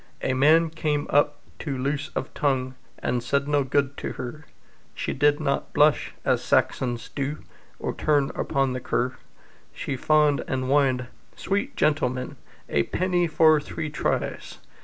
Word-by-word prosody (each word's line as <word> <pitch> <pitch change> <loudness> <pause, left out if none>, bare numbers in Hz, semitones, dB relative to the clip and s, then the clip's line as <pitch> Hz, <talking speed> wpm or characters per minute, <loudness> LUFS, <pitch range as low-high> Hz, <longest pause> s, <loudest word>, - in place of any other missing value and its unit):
A 130 - +1
man 155 +5 +4
came 150 -2 -1
up, 145 0 +3 0.2
too 140 -4 -3
loose 140 +3 -2
of 130 - -3
tongue, 130 -3 0 0.2
And 125 - -1
said 140 +3 0
no 145 -1 +2
good 140 +1 0
to - - -4
her; 140 +5 -7 0.5
She - - -2
did 145 +2 +3
not 140 - -1
blush 150 0 +3
as - - +2
Saxons 120 -2 0
do, 140 +2 -4 0.3
Or - - -3
turn 145 -3 +1
upon 135 -2 0
the 130 - -3
cur; 125 +1 -1 0.6
She 140 - -3
fawned 150 +2 +3
and 130 0 -1
whined 130 -2 +2 0.3
"Sweet 205 +8 -2
gentleman, 130 -4 0 0.3
A 70 - +2
penny 180 -1 +1
for 155 -1 +5
three 150 +1 -5
tries!" 150 - -2
145 Hz, 150 wpm, -25 LUFS, 130-150 Hz, 0.6 s, for